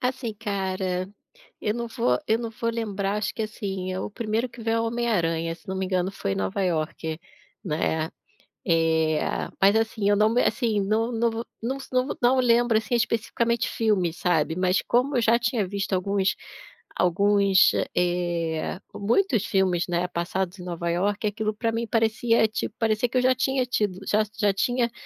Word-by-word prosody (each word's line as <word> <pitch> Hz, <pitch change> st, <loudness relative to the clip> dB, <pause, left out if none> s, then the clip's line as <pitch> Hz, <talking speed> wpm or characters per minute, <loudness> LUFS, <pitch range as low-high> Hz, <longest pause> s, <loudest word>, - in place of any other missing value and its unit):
Assim 250 Hz, -3 st, -2 dB
cara, 190 Hz, -3 st, -2 dB, 0.5 s
eu 210 Hz, -, -1 dB
não 235 Hz, 0 st, -3 dB
vou 225 Hz, -, +1 dB
eu 220 Hz, +1 st, +2 dB
não 235 Hz, -1 st, -4 dB
vou 230 Hz, 0 st, -2 dB
lembrar. 205 Hz, -3 st, -2 dB
Acho 210 Hz, -, -2 dB
que, -, -, -4 dB
assim, 195 Hz, -3 st, -4 dB
é 185 Hz, -, -3 dB
o -, -, -4 dB
primeiro 225 Hz, +3 st, -2 dB
que 235 Hz, 0 st, -12 dB
vem 225 Hz, 0 st, 0 dB
é 230 Hz, -, +2 dB
o 225 Hz, -, 0 dB
Homem-aranha. 175 Hz, -9 st, 0 dB
Se -, -, -25 dB
não 190 Hz, -, -3 dB
me 190 Hz, -, -1 dB
engano, 185 Hz, 0 st, 0 dB
foi 145 Hz, -, -3 dB
em -, -, -4 dB
Nova 95 Hz, -, -2 dB
Iorque, 160 Hz, -2 st, -2 dB, 0.4 s
né? 160 Hz, -2 st, -1 dB, 0.6 s
Eh, 160 Hz, -2 st, +2 dB, 0.4 s
mas, 200 Hz, +2 st, +6 dB
assim, 220 Hz, -2 st, 0 dB
eu 205 Hz, -, +4 dB
não 210 Hz, +1 st, +4 dB
me 240 Hz, +3 st, +2 dB
assim, 225 Hz, -5 st, +1 dB
não 220 Hz, +4 st, 0 dB
não 230 Hz, 0 st, +1 dB
vo 230 Hz, +1 st, -4 dB, 0.2 s
não 245 Hz, +4 st, -2 dB
s 270 Hz, -, -10 dB
não 255 Hz, 0 st, +1 dB
não 250 Hz, +2 st, +4 dB
lembro, 240 Hz, -2 st, +4 dB
assim, 230 Hz, +3 st, -1 dB
especificamente 235 Hz, 0 st, 0 dB
filmes, 190 Hz, -7 st, 0 dB
sabe? 165 Hz, -4 st, +1 dB
Mas 185 Hz, +1 st, +2 dB
como 255 Hz, +3 st, +2 dB
eu -, -, +3 dB
já 230 Hz, +1 st, +4 dB
tinha 230 Hz, -4 st, 0 dB
visto 200 Hz, +1 st, -3 dB
alguns 195 Hz, +1 st, +1 dB, 0.6 s
alguns, 200 Hz, +2 st, +4 dB
eh -, -, 0 dB
eh, 175 Hz, -1 st, -1 dB, 0.2 s
muitos 230 Hz, -, +1 dB
filmes, 190 Hz, -5 st, +1 dB
né, 175 Hz, 0 st, 0 dB
passados 180 Hz, +2 st, -3 dB
em 180 Hz, -, -7 dB
Nova 170 Hz, -1 st, -3 dB
Iorque, 200 Hz, +5 st, 0 dB
aquilo 215 Hz, +1 st, -2 dB
para 225 Hz, +1 st, -1 dB
mim 230 Hz, +1 st, -2 dB
parecia 225 Hz, 0 st, +2 dB
tipo 215 Hz, 0 st, -4 dB
parecia 225 Hz, +1 st, +1 dB
que 255 Hz, -, -1 dB
eu -, -, +4 dB
já 255 Hz, 0 st, +5 dB
tinha 260 Hz, 0 st, +1 dB
tido 210 Hz, -6 st, -1 dB
já 215 Hz, +1 st, +3 dB, 0.2 s
já 205 Hz, -2 st, +3 dB
tinha 240 Hz, +4 st, 0 dB
210 Hz, 190 wpm, -25 LUFS, 180-230 Hz, 0.6 s, mas